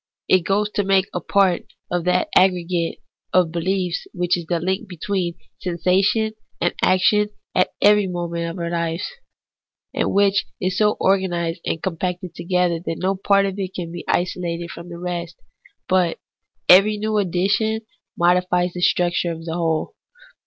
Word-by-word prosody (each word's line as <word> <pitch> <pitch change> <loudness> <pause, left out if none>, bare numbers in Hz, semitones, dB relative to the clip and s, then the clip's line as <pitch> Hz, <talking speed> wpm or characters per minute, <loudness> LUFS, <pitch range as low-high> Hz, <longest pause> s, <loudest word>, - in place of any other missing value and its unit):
It 185 - +5
goes 205 +2 +1
to 205 - 0
make 195 -1 +3
a - - -1
part 195 -3 +2 0.3
of 175 -1 -1
that 180 0 +2
aggregate 180 -2 +2 0.4
of 180 -3 +3
behefs 180 +1 -1
which 175 0 +1
is 170 -2 -6
the 170 0 0
link 190 +4 -2
between 180 0 -2 0.2
sensation 190 +5 +1 0.3
and 175 - +1
action 210 +3 +3 0.2
at 185 - +3
every 210 -1 +5
moment 170 -1 -3
of 165 - -7
all 170 - -4
our 170 - -3
lives, 170 - -2 0.8
and - - 0
which 200 0 +3
is 185 0 -1
so 210 -1 +3
organized 175 -3 +1
and 160 - -2
compacted 180 0 -3
together 175 0 0
that 165 - -3
no 190 +2 0
part 200 +1 +3
of 195 0 -3
it 190 -1 -4
can 170 -2 -5
be 175 - -7
isolated 175 -1 -1
from 170 +1 -10
the 170 - -8
rest, 175 -1 -5 0.5
but 180 -3 +2 0.5
every 200 +4 +7
new 215 +1 -1
addition 200 +4 +1 0.4
modifies 180 0 +2
the 180 - -5
structure 175 -1 +2
of 165 0 -7
the 165 - -3
whole. 165 -2 -1
180 Hz, 160 wpm, -21 LUFS, 170-195 Hz, 0.8 s, every